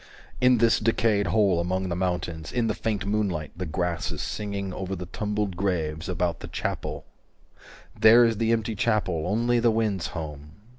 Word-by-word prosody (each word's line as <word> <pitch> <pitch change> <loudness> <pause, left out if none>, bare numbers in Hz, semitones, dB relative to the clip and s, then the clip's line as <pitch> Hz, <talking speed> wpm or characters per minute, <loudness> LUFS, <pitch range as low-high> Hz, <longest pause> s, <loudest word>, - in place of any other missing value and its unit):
In 125 0 +5
this 115 0 +4
decayed 110 -2 +2
hole 95 -1 +3
among 95 +2 -1
the 85 - -1
mountains 90 -3 -2
385 - - -7
In 115 - +1
the - - +1
faint 105 -3 -2
moonlight, 100 -7 -1
the 90 0 -4
grass 85 +2 -2
is - - -5
singing 100 -2 -4
Over 95 +1 -4
the 90 0 -6
tumbled 105 +1 -2
graves, 85 -4 -2
about 90 -1 -1
the - - -8
chapel - - -4 0.9
There 115 +2 +8
is 115 -2 +1
the 115 +1 +1
empty 115 -1 0
chapel, 100 -7 0
only 120 +4 +2
the 120 0 +4
wind's 110 -5 0
home. 75 -3 -7
100 Hz, 180 wpm, -26 LUFS, 90-110 Hz, 0.9 s, There